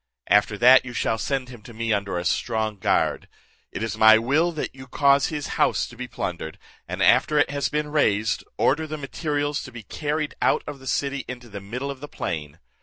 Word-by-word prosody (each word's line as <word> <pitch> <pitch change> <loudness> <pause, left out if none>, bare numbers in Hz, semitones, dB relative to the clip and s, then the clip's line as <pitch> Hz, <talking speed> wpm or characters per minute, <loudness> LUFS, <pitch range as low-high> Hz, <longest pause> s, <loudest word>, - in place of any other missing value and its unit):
After 105 0 +3
that 125 +4 +7
you 125 -1 -8
shall 110 -1 0
send 135 -1 -2
him 120 -4 -11
to 115 +1 -13
me 115 0 0
under 100 -3 -1
a 85 - -3
strong 110 -2 -1
guard. - - +1 0.4
It - - -4
is 110 -1 -4
my 110 0 +8
will 145 +10 +2
that 155 - -4
you 130 0 -12
cause 140 +1 +3
his 150 -2 -4 0.2
house - - +2
to 120 - -12
be 125 +1 -6
plundered; 85 -8 -5 0.3
and 90 +2 -2
after 125 - +4
it 145 - +3
has 140 0 -1
been 150 0 -2
razed, 110 -8 +1
order 155 +4 +2
the 155 0 -5
materials 145 0 -2
to 130 - -9
be 115 -2 -9
carried 150 +6 -3
out - - +2
of 145 -2 -7
the 130 - -12
city 140 0 -1
into 125 -1 -8
the 100 -1 -7
middle 125 +8 -4
of 135 - -9
the 145 - -8
plain. 75 - -5
125 Hz, 215 wpm, -24 LUFS, 110-145 Hz, 0.4 s, my